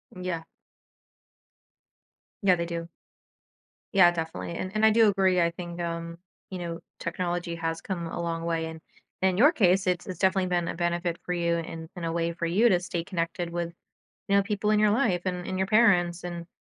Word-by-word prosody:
Mm, 180 - -8
yeah. 170 -3 -2 2.0
Yeah 185 -2 +5
they 170 - -2
do. 170 0 -5 1.1
Yeah, 175 -3 +7
definitely, 165 0 -4
and 185 +2 -4
and 215 +1 +4
I 220 - +7
do 225 0 +5
agree 190 -2 +3
I 170 - +3
think, 175 0 -7
um, 170 0 -4 0.3
you 185 - -4
know, 170 -1 -4 0.2
technology 175 0 -2
has 165 0 -3
come 175 -3 -4
a 170 - -4
long 165 -1 -2
way, 165 -1 0
and 160 0 -8 0.4
in 190 -1 +2
your 285 +7 +7
case, 190 - +3
it's 180 -1 0
it's 185 -3 -7
definitely 190 -1 +2
been 175 -1 0
a - - -3
benefit 175 0 -1
for 180 - -1
you 170 -1 +1
in 165 -1 -6
in 175 - -7
a 165 - -1
way 170 0 0
for 170 0 -3
you 210 +8 +4
to 180 - +4
stay 175 -1 -3
connected 170 -1 -3
with, 170 0 -3 0.5
you 200 - +3
know, 200 - +6
people 210 0 0
in 215 - +4
your 210 0 +5
life 205 -4 +2
and 180 -1 -2
and 185 - -3
your 190 - +1
parents 180 -6 +4
and 170 -1 -6
175 Hz, 200 wpm, -27 LUFS, 170-190 Hz, 2.0 s, Yeah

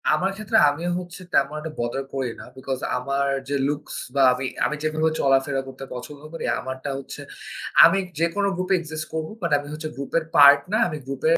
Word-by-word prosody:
আমার 180 +6 +2
ক্ষেত্রে 215 -1 0
আমি 145 +4 -4 0.2
হচ্ছে 180 +1 -9
তেমন 140 +1 +3
একটা 160 0 -6
বদার 120 +3 -2
করি 130 -3 -2
না। - - -9
বিকজ 130 0 -4 0.2
আমার 140 +2 -1 0.2
যে 145 - 0
লুকস 145 +1 -4 0.2
বা 140 - +3
আমি 130 +2 -4 0.2
আমি 150 - -1
যেভাবে 155 +1 +1
চলাফেরা 135 0 +2
করতে 135 0 -9
পছন্দ 140 +4 -8
করি 165 - -5
আমারটা 130 +2 -5
হচ্ছে 135 - -9 0.6
আমি 195 - +4 0.2
যেকোনো 170 +5 +1
গ্রুপ 185 +1 -3
এ - - +6
এক্সিস্ট 155 -1 -5
করব। 160 -1 -2
বাট 170 - -1
আমি 145 0 -6
হচ্ছে 155 +1 -5
গ্রুপের 140 +4 -1
পার্ট 140 0 +9
না, - - +4
আমি 155 -3 -4
গ্রুপের 140 +5 +1
145 Hz, 195 wpm, -24 LUFS, 135-165 Hz, 0.6 s, পার্ট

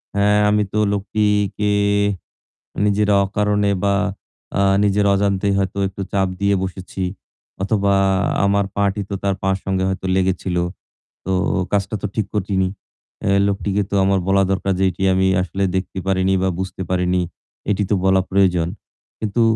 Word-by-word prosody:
"হ্যাঁ, 105 +1 +3
আমি 105 0 +3
তো 105 - +1
লোকটিকে 105 0 0 1.1
নিজের 105 0 +2 0.2
অকারণে 105 +1 +1
বা 100 0 +3 0.6
আ 100 - +3 0.2
নিজের 100 0 +2
অজান্তেই 100 0 +1
হয়তো 95 0 -2
একটু 100 +1 -7
চাপ 95 -1 +2
দিয়ে 100 0 +2
বসেছি 95 0 -5 0.6
অথবা 100 0 +1 0.5
আমার 100 0 +2
পা'টি 100 0 +1
তো - - -2
তার 100 -1 +1
পায়ের 95 0 +1
সঙ্গে 95 -1 0
হয়তো 95 0 -3
লেগেছিল। 95 -1 0 0.7
তো 95 - -2 0.4
কাজটা 100 +1 0
তো - - 0
ঠিক 110 -3 -1
করিনি। 95 -2 0 0.6
এ - - +2 0.2
লোকটিকে 100 0 0
তো - - -3
আমার 95 0 +2
বলা 95 0 +4
দরকার 95 0 0
যে 95 - +2
এটি 95 - -7
আমি 95 0 +2 0.2
আসলে 95 +2 -3
দেখতে 95 0 -3
পারিনি 95 0 +2
বা 95 - +2
বুঝতে 95 0 -4
পারিনি। 90 0 +1 0.5
এটি 105 0 +1
তো - - +4
বলা 95 0 +4
প্রয়োজন।" 90 -3 +2 0.5
কিন্তু 110 +2 0
100 Hz, 150 wpm, -20 LUFS, 95-100 Hz, 1.1 s, বলা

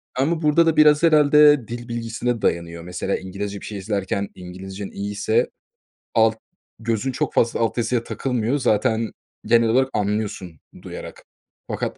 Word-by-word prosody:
Ama 155 +5 0
burada 155 +2 +4
da 160 -2 +1
biraz 150 0 +6
herhâlde 150 -4 +5
dil 120 0 -7
bilgisine 115 0 -3
dayanıyor. 85 0 -1
Mesela, 90 +2 -3
İngilizce 100 +2 -6
bir - - -9
şey 105 - -6
izlerken 100 0 -2
İngilizcen 95 +2 -8
iyiyse 105 - -1 0.6
alt 110 -1 +3 0.4
gözün 115 +3 -1
çok - - -2
fazla 115 - +2
alt 115 +1 0
yazıya 120 0 0
takılmıyor. 125 +1 -1
Zaten 115 -2 +1 0.3
genel 115 0 +4
olarak 130 +3 +3
anlıyorsun, 100 -5 -2 0.2
duyarak. - - -9 0.4
Fakat - - -3
115 Hz, 140 wpm, -22 LUFS, 100-130 Hz, 0.6 s, biraz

